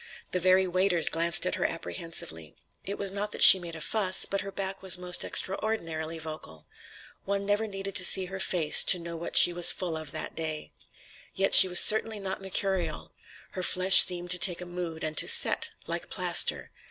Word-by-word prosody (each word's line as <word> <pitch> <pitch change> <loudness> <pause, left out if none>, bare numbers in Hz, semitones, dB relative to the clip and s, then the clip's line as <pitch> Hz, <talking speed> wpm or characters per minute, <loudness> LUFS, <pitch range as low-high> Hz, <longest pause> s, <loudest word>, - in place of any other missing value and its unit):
The 180 - -4
very 185 +1 +1
waiters 185 -1 0
glanced 170 +2 -1
at 180 - -4
her - - -4
apprehensively. 165 - -7 0.3
It 200 - -8
was 200 -1 -3
not 205 +1 -6
that - - 0
she 190 - +9
made 170 -2 -11
a 160 - -11
fuss, 190 +2 -2
but 195 - -5
her 195 - -10
back 195 0 -7
was 190 -1 0
most 180 0 0
extraordinarily 165 -6 -3
vocal. 155 - -11 0.6
One 200 0 -4
never 205 +2 -3
needed 195 -1 -9
to 180 - +1
see 190 +1 +4
her 190 +1 -10
face 165 -5 +3
to 185 - +4
know 170 -1 -10
what 165 +1 -2
she 175 - +7
was 175 0 +5
full 175 -3 -6
of 155 -1 -9
that 155 - -8
day. 155 -2 -7 0.6
Yet 195 0 -2
she 190 - +9
was 180 -1 +3
certainly 220 0 +2
not 195 0 -7
mercurial. 180 - -2 0.4
Her 185 - -8
flesh 185 +1 +6
seemed 175 -1 -5
to 180 - +1
take 175 -1 +2
a 180 - -9
mood 175 -2 -8
and 155 0 -6
to - - +5
"set," - - +3 0.2
like - - -7
plaster. - - -1
180 Hz, 200 wpm, -25 LUFS, 165-195 Hz, 0.6 s, she